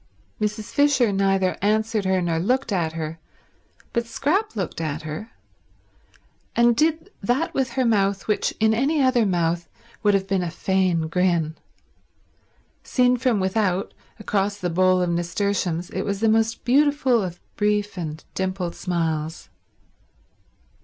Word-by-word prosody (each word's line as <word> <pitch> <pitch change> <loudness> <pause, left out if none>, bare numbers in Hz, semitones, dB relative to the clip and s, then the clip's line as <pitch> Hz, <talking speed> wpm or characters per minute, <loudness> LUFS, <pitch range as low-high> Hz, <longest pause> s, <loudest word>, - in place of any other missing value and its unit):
Mrs. 210 0 -2
Fisher 285 -6 +3
neither 195 -1 +1
answered 215 +1 +1
her 190 -1 +2
nor 165 -1 0
looked 250 +7 0
at 170 -5 0
her; 160 0 -5 0.7
but 235 0 -1
Scrap 330 - 0
looked 190 -5 -3
at 155 0 -3
her, 155 +8 -6 1.2
and 235 0 +4
did 320 - +1
that 250 - 0
with 260 -3 -1
her 260 0 +1
mouth 200 -3 +1
which 210 - +1
in 220 0 +4
any 275 +7 +1
other 250 -4 +3
mouth 170 -2 0 0.3
would 205 -1 +3
have 195 -1 0
been 195 -1 0
a 175 - -2
faint 175 -2 0
grin. 170 -4 +1 1.3
Seen 250 -1 +2
from 245 -3 +1
without, 190 0 0 0.2
across 205 -1 -1
the 180 -4 -2
bowl 185 +1 +3
of 175 - 0
nasturtiums, 175 0 -1
it 190 - -2
was 200 0 -2
the 225 - +2
most 225 +1 +1
beautiful 270 -2 +3
of 180 -2 -5 0.2
brief 210 -1 0
and 155 -3 -5
dimpled 185 -2 -2
smiles. 160 - -3
195 Hz, 140 wpm, -23 LUFS, 175-230 Hz, 1.3 s, and